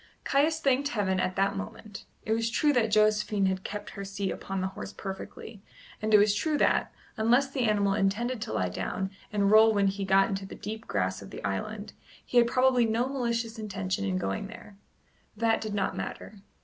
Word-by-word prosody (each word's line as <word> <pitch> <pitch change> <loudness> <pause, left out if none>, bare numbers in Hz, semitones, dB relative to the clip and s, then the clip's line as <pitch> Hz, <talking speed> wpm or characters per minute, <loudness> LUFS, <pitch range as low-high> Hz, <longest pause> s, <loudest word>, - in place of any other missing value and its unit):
Caius 310 +4 +2
thanked 275 -1 +2
Heaven 200 -8 0
at 185 0 -1
that 195 +1 +1
moment 210 0 -8 0.2
It 220 - +1
was 225 0 0
true 295 +5 +2
that 235 -4 +2
Josephine 210 -2 +2
kept 205 +2 -6
her 200 - -7
seat 195 0 -3
upon 195 0 -4
the 190 0 -1
horse 100 - -8
perfectly, 195 - -8 0.4
and 215 0 -1
it 210 - +8
was 205 0 +4
true 300 +8 0
that, - - +2 0.3
unless 245 +5 +3
the 260 -3 0
animal 205 -2 +2
intended 215 +5 0
to 225 - -4
lie 90 -1 0
down 190 - -3 0.2
and 200 -1 +2
roll 220 +1 +7
when 200 -1 +3
he 195 +1 -1
got 195 0 +4
into 195 0 -4
the - - -9
deep 220 +1 -7
grass 95 -1 -1
of 100 - -10
the - - -9
island, 205 - -4 0.3
he 245 - +3
had 235 - +4
probably 255 -1 +3
no 230 +3 +1
malicious 235 -4 -2
intention 195 - -3
in 95 -1 0
going 95 - -2
there. 215 -1 -12 0.6
That 225 0 +2
did 215 -2 -4
not 195 -2 -1
matter. 205 -2 -7
210 Hz, 200 wpm, -28 LUFS, 195-230 Hz, 0.6 s, it